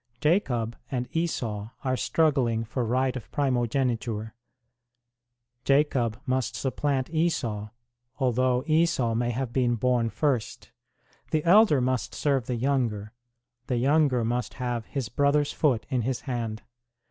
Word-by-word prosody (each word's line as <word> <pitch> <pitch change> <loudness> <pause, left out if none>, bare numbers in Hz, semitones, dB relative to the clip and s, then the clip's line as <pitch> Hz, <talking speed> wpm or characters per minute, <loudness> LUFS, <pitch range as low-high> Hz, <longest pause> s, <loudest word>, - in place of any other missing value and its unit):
Jacob 130 - +1
and 125 -2 -2
Esau 115 -11 -2
are 130 -1 +1
struggling 130 -7 +1
for 120 +3 -3
right 130 +3 0
of 125 - -8
primo 130 -4 +1
geniture 115 -3 -1 1.3
Jacob 135 -5 +2
must 130 -2 -1
supplant 135 0 -1
Esau, 120 -11 -1 0.5
although 130 -1 +1
Esau 155 -7 +2
may 120 +1 0
have 120 0 -3
been 120 -2 +2
born 120 0 +1
first; 135 -4 -2 0.6
the 155 -1 0
elder 185 -4 +6
must 130 0 -1
serve 135 -5 0
the 125 - -1
younger, 115 -5 -1 0.6
the 125 - 0
younger 135 -2 +3
must 120 0 -2
have 120 -3 -3
his 135 -5 -3
brother 145 +4 +2
s 145 - -3
foot 130 -8 +1
in 130 -2 +1
his 125 +2 -2
hand. 115 -4 -4
125 Hz, 135 wpm, -27 LUFS, 115-140 Hz, 1.3 s, elder